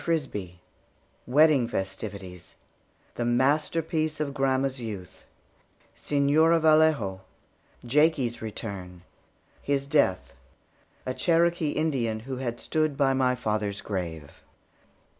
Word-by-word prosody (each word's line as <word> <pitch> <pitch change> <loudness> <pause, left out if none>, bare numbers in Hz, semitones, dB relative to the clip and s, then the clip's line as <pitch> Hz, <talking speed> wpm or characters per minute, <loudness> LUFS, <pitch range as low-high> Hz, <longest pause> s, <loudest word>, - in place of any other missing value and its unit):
FRISBIE 130 - -2 0.7
WEDDING 145 -1 +4
FESTIVITIES 95 -2 -6 0.6
THE 120 - -3
MASTERPIECE 155 +5 +1
OF 145 -2 -2
GRANDMA'S 135 -1 0
YOUTH 100 -6 -8 0.7
SEÑORA 150 +4 +3
VALLEJO 155 -12 +3 0.6
JAKIE'S 135 -2 +2
RETURN 100 -5 -7 0.6
HIS 140 -1 -1
DEATH 140 -11 +1 0.7
A 130 - -2
CHEROKEE 170 0 +1
INDIAN 125 -8 -1
WHO 130 +2 -6
HAD 120 -2 -4
STOOD 155 -3 -1
BY 135 -2 +3
MY 130 -1 +2
FATHER'S 105 -4 -2
GRAVE. 85 -7 -6
130 Hz, 95 wpm, -27 LUFS, 105-155 Hz, 0.7 s, WEDDING